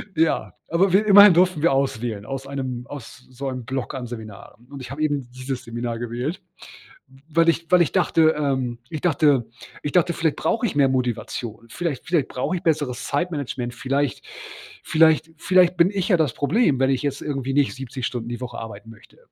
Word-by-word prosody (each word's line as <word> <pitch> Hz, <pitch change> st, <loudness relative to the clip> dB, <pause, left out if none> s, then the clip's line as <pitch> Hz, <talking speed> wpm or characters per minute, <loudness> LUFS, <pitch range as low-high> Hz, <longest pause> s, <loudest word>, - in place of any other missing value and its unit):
Ja, 160 Hz, +1 st, +1 dB, 0.2 s
aber 180 Hz, +2 st, +2 dB
wir 210 Hz, +2 st, +4 dB
immerhin 205 Hz, -2 st, +9 dB
durften 180 Hz, -3 st, +3 dB
wir 165 Hz, -, +4 dB
auswählen, 120 Hz, -6 st, -1 dB
aus 135 Hz, +1 st, -6 dB
einem 130 Hz, -3 st, -5 dB
aus 135 Hz, -2 st, -10 dB
so 135 Hz, +2 st, -5 dB
einem 130 Hz, -3 st, -6 dB
Bock 130 Hz, +1 st, -4 dB
an 125 Hz, -2 st, -5 dB
Seminaren. 110 Hz, 0 st, -10 dB
Und 140 Hz, -2 st, -8 dB
ich 125 Hz, -, -8 dB
habe 150 Hz, +3 st, -6 dB
eben 145 Hz, -5 st, -1 dB
dieses 130 Hz, 0 st, -5 dB
Seminar 115 Hz, 0 st, -4 dB
gewählt, 120 Hz, +8 st, -4 dB, 0.9 s
weil 165 Hz, +2 st, +3 dB
ich 165 Hz, 0 st, 0 dB
weil 180 Hz, -1 st, +6 dB
ich 165 Hz, -, +2 dB
dachte 165 Hz, -4 st, +3 dB
ähm, 130 Hz, -5 st, -1 dB
ich 155 Hz, -3 st, -5 dB
dachte 145 Hz, -7 st, +3 dB, 0.4 s
ich 145 Hz, -, -2 dB
dachte, 175 Hz, -1 st, +3 dB
vielleicht 160 Hz, -2 st, 0 dB
brauche 230 Hz, +1 st, 0 dB
ich 175 Hz, -, -5 dB
mehr 140 Hz, -2 st, +4 dB
Motivation. 120 Hz, -2 st, -3 dB
Vielleicht 165 Hz, -1 st, -4 dB
vielleicht 165 Hz, -6 st, +1 dB
brauche 175 Hz, +8 st, -2 dB
ich -, -, -7 dB
besseres 145 Hz, -7 st, -1 dB
Zeitmanagement. 140 Hz, -6 st, -3 dB
Vielleicht 135 Hz, +2 st, -2 dB, 0.6 s
vielleicht 160 Hz, 0 st, +3 dB
vielleicht 180 Hz, -1 st, +3 dB
bin 170 Hz, +2 st, +5 dB
ich 195 Hz, +1 st, -2 dB
ja 180 Hz, -, +5 dB
das 150 Hz, -7 st, +1 dB
Problem, 150 Hz, -, +2 dB
wenn 135 Hz, 0 st, +3 dB
ich 130 Hz, -, 0 dB
jetzt 140 Hz, -1 st, -2 dB
irgendwie 135 Hz, -2 st, -3 dB
nicht 145 Hz, -1 st, +2 dB
70 130 Hz, -1 st, -5 dB
Stunden 120 Hz, -2 st, -4 dB
die 120 Hz, +1 st, -5 dB
Woche 120 Hz, -1 st, -6 dB
arbeiten 115 Hz, 0 st, -9 dB
möchte. 110 Hz, -, -18 dB
140 Hz, 195 wpm, -23 LUFS, 125-165 Hz, 0.9 s, immerhin